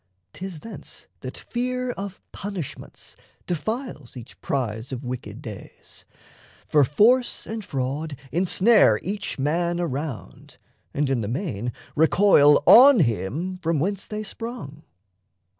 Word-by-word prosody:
'Tis 185 Hz, -4 st, -7 dB
thence 225 Hz, -, -10 dB
That -, -, -7 dB
fear 250 Hz, +1 st, -2 dB
of 200 Hz, -4 st, -7 dB
punishments 195 Hz, -7 st, -7 dB, 0.3 s
defiles 180 Hz, -, -4 dB
each 120 Hz, -1 st, -12 dB
prize 120 Hz, -3 st, -2 dB
Of 130 Hz, 0 st, -5 dB
wicked 125 Hz, 0 st, -6 dB
days; -, -, -11 dB, 0.6 s
for 150 Hz, -2 st, +4 dB
force 225 Hz, -, +3 dB
and 220 Hz, 0 st, -5 dB
fraud 140 Hz, +2 st, -3 dB, 0.2 s
ensnare 185 Hz, -, +4 dB
Each 200 Hz, +2 st, -4 dB
man 170 Hz, +5 st, 0 dB
around, 145 Hz, -6 st, -5 dB, 0.3 s
and 145 Hz, 0 st, 0 dB
in 135 Hz, -3 st, 0 dB
the 105 Hz, -, -3 dB
main 125 Hz, -, -3 dB, 0.2 s
recoil 155 Hz, -2 st, +5 dB
On 255 Hz, 0 st, +9 dB
him 150 Hz, -, -1 dB
from 165 Hz, -2 st, 0 dB
whence 195 Hz, +6 st, -2 dB
they 215 Hz, 0 st, -4 dB
sprung. 215 Hz, -, -7 dB
165 Hz, 120 wpm, -24 LUFS, 135-205 Hz, 0.6 s, On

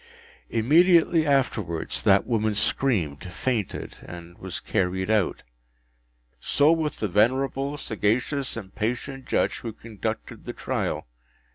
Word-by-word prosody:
Immediately 160 Hz, +6 st, +4 dB
afterwards 110 Hz, -, 0 dB
that 100 Hz, 0 st, +4 dB
woman 110 Hz, -3 st, 0 dB
screamed, 90 Hz, -, 0 dB
fainted, 110 Hz, +3 st, -2 dB
and 85 Hz, 0 st, -10 dB
was 95 Hz, -1 st, -5 dB
carried 95 Hz, 0 st, -1 dB
out. 105 Hz, -4 st, +1 dB, 1.0 s
So 145 Hz, +2 st, +3 dB
with 160 Hz, -3 st, 0 dB
the 105 Hz, -, -1 dB
venerable, 135 Hz, +8 st, +1 dB
sagacious, 125 Hz, +4 st, -1 dB
and 95 Hz, -4 st, -8 dB
patient 125 Hz, +4 st, -3 dB
Judge -, -, +1 dB
who 115 Hz, -, -5 dB
conducted 110 Hz, 0 st, -6 dB
the -, -, -5 dB
trial. -, -, -2 dB
115 Hz, 115 wpm, -25 LUFS, 100-135 Hz, 1.0 s, Immediately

